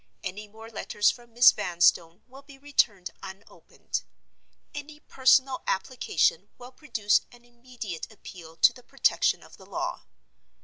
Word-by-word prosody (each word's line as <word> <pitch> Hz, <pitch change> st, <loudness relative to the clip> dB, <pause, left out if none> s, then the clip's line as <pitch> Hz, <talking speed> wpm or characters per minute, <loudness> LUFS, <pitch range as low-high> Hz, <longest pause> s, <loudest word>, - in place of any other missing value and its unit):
Any 205 Hz, +3 st, -6 dB
more 220 Hz, +2 st, -13 dB
letters 210 Hz, -1 st, +1 dB
from 240 Hz, -1 st, -15 dB
Miss 240 Hz, +2 st, +8 dB
Vanstone 170 Hz, -1 st, +1 dB
will 265 Hz, +2 st, -14 dB
be 280 Hz, -1 st, -16 dB
returned 235 Hz, -10 st, 0 dB
unopened. 195 Hz, +2 st, -7 dB, 0.7 s
Any 295 Hz, +1 st, -8 dB
personal 260 Hz, -1 st, +3 dB
application 195 Hz, -, 0 dB
will 245 Hz, +1 st, -12 dB
produce 225 Hz, -7 st, +1 dB
an 240 Hz, 0 st, -19 dB
immediate 240 Hz, -7 st, -8 dB
appeal 170 Hz, -6 st, -12 dB
to -, -, +5 dB
the -, -, -15 dB
protection -, -, +1 dB
of -, -, -16 dB
the -, -, -16 dB
law. -, -, -4 dB
230 Hz, 135 wpm, -27 LUFS, 190-255 Hz, 0.7 s, Miss